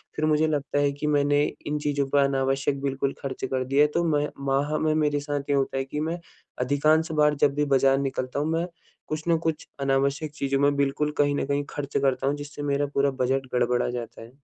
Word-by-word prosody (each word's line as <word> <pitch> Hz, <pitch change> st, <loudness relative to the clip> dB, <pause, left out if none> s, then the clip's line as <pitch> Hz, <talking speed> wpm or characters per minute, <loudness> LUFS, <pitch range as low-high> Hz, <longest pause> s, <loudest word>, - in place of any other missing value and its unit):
फिर 155 Hz, -, 0 dB
मुझे 155 Hz, 0 st, +3 dB
लगता 145 Hz, -2 st, -1 dB
है 145 Hz, 0 st, +2 dB
कि 145 Hz, +2 st, -4 dB
मैंने 145 Hz, 0 st, +3 dB, 0.2 s
इन 150 Hz, 0 st, -1 dB
चीज़ों 145 Hz, -1 st, 0 dB
पे 140 Hz, 0 st, +4 dB
अनावश्यक 135 Hz, 0 st, 0 dB
बिल्कुल 135 Hz, 0 st, -1 dB
खर्च 135 Hz, -1 st, -4 dB
कर 130 Hz, -, +1 dB
दिया। 140 Hz, +3 st, +4 dB
तो 170 Hz, -, +2 dB
मैं 145 Hz, 0 st, 0 dB, 0.2 s
माह 140 Hz, +3 st, +1 dB
में 155 Hz, -1 st, +1 dB
मेरे 150 Hz, -2 st, +1 dB
साथ 145 Hz, 0 st, -3 dB
ये 140 Hz, -, +3 dB
होता 135 Hz, 0 st, 0 dB
है 135 Hz, -, -1 dB
कि 150 Hz, +2 st, -5 dB
मैं 165 Hz, +3 st, -2 dB, 0.4 s
अधिकांश 155 Hz, +5 st, +2 dB
बार 150 Hz, -1 st, +3 dB
जब 140 Hz, -, +1 dB
भी 150 Hz, 0 st, +1 dB
बाज़ार 135 Hz, 0 st, +4 dB
निकलता 135 Hz, -1 st, -2 dB
हूँ 150 Hz, +2 st, 0 dB
मैं 165 Hz, +1 st, 0 dB, 0.4 s
कुछ 155 Hz, 0 st, -3 dB
न 165 Hz, -1 st, +4 dB
कुछ 160 Hz, -2 st, -2 dB
अनावश्यक 140 Hz, +2 st, 0 dB
चीज़ों 140 Hz, -2 st, 0 dB
में 145 Hz, 0 st, +3 dB
बिल्कुल 140 Hz, +2 st, 0 dB
कहीं 145 Hz, 0 st, +3 dB
न -, -, -1 dB
कहीं 140 Hz, 0 st, 0 dB
खर्च 145 Hz, -1 st, -3 dB
करता 135 Hz, 0 st, +1 dB
हूँ, 145 Hz, -, +1 dB
जिससे 145 Hz, 0 st, -8 dB
मेरा 145 Hz, 0 st, +1 dB
पूरा 140 Hz, 0 st, +2 dB
बजट 135 Hz, +1 st, 0 dB
गड़बड़ा 125 Hz, 0 st, +1 dB
जाता 120 Hz, -2 st, -6 dB
है। 115 Hz, +2 st, -12 dB
145 Hz, 220 wpm, -25 LUFS, 135-150 Hz, 0.4 s, पे